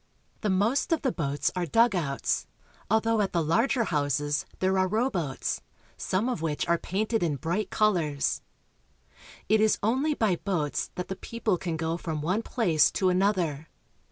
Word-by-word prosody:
The 210 - 0
most 210 - +1
of 325 - +1
the 260 - +2
boats 145 -6 -1
are 180 -1 -1
dugouts, 175 - +1 0.4
although 220 +1 +2
at 195 -2 -1
the 170 -2 +2
larger 230 - +2
houses 145 - 0
there 190 0 +1
are 185 - +3
rowboats, 190 - -1 0.3
some 195 +6 -1
of 245 -10 -2
which 155 -3 -1
are 170 0 +2
painted 215 +4 -1
in 160 -4 +1
bright 175 +8 -2
colors. 170 -10 +1 1.1
It 215 0 +4
is 215 0 +3
only 265 +8 +1
by 210 -8 +1
boats 170 -7 -2
that 180 - -4
the 190 - -4
people 225 -4 -2
can 170 -3 -3
go 165 +1 -1
from 160 -3 -4
one 185 +7 +1
place 180 - +2
to 185 - +2
another. 180 -6 0
185 Hz, 160 wpm, -27 LUFS, 160-220 Hz, 1.1 s, It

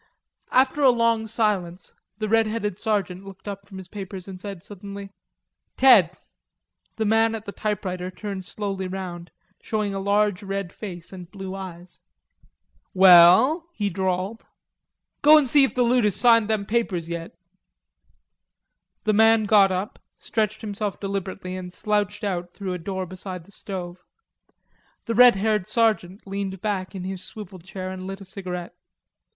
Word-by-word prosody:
After 260 +3 +3
a 270 - +7
long 230 -2 +2
silence 200 -5 -1 0.2
the 215 0 -2
red 225 +1 +3
headed 215 -3 -2
sergeant 195 -3 -2
looked 195 0 -12
up 200 -1 -6
from 195 -2 -10
his 190 -1 -9
papers 190 -2 -8
and 185 -1 -9
said 195 -4 -7
suddenly: 200 0 -9 0.7
"Ted." 230 - +6 0.8
The 220 - -1
man 225 +1 +3
at 220 -1 -7
the 200 - -5
typewriter 185 -4 -3
turned 190 -1 -6
slowly 195 -3 -4
round, 180 -2 -6 0.3
showing 210 -2 -2
a 195 - -3
large 205 -1 +1
red 195 -2 -4
face 180 -4 -8
and 180 -2 -9
blue 190 -1 -7
eyes. 180 -2 -9 1.0
"We 190 0 +7
ell," 220 - +7
he 205 -2 -1
drawled. 190 +3 -2 0.7
"Go 305 +2 +8
in 305 - +5
an' - - -4
see 285 +2 +6
if - - -5
the 250 - +3
loot 245 0 +3
has 210 -3 +2
signed 230 -1 +5
them 215 -2 0
papers 200 -7 -1
yet." 170 0 -6 1.7
The 215 - +2
man 225 +1 +5
got 200 -2 +5
up, 185 +3 -3 0.2
stretched 215 -1 -2
himself 205 -1 -4
deliberately, 195 -2 -4
and 180 -1 -7
slouched 210 +2 -1
out 175 -3 -3
through 195 -3 -4
a 180 - -4
door 190 +2 -4
beside 185 0 -7
the 200 - -20
stove. 180 -3 -7 1.0
The 230 - -1
red 245 0 +7
haired 210 -1 0
sergeant 215 -4 0
leaned 195 -1 -4
back 195 -2 -3
in 185 - -5
his 185 0 -5
swivel 195 -1 -9
chair 185 +1 -7
and 185 0 -7
lit 195 +1 -6
a 195 - -11
cigarette. 180 -3 -6
195 Hz, 160 wpm, -24 LUFS, 185-215 Hz, 1.7 s, Go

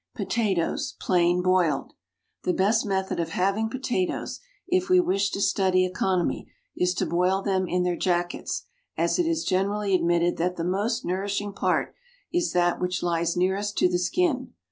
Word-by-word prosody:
POTATOES, 195 -8 -1
PLAIN 175 -1 +2
BOILED. 180 -6 +1 0.5
The 180 - 0
best 215 +3 +2
method 190 -2 -1
of 165 - -1
having 200 +4 0
potatoes, 245 -7 -2 0.3
if 365 0 +1
we 365 0 +6
wish 200 - +1
to - - -4
study 190 -2 +2
economy, 185 -1 -1 0.3
is 180 0 +1
to - - 0
boil 180 +3 +1
them 190 -2 0
in 180 +1 0
their 180 -1 0
jackets, 175 -1 -1 0.3
as - - +1
it 345 - +2
is 330 0 0
generally 200 +1 0
admitted 175 -1 +2
that 180 +2 0
the 165 - -3
most 205 +7 -1
nourishing 200 +2 -2
part - - 0 0.4
is 350 0 +1
that 175 -1 +2
which 180 0 -1
lies 170 0 0
nearest 195 +3 0
to - - +4
the 180 0 0
skin. 260 - 0
185 Hz, 165 wpm, -26 LUFS, 180-205 Hz, 0.5 s, we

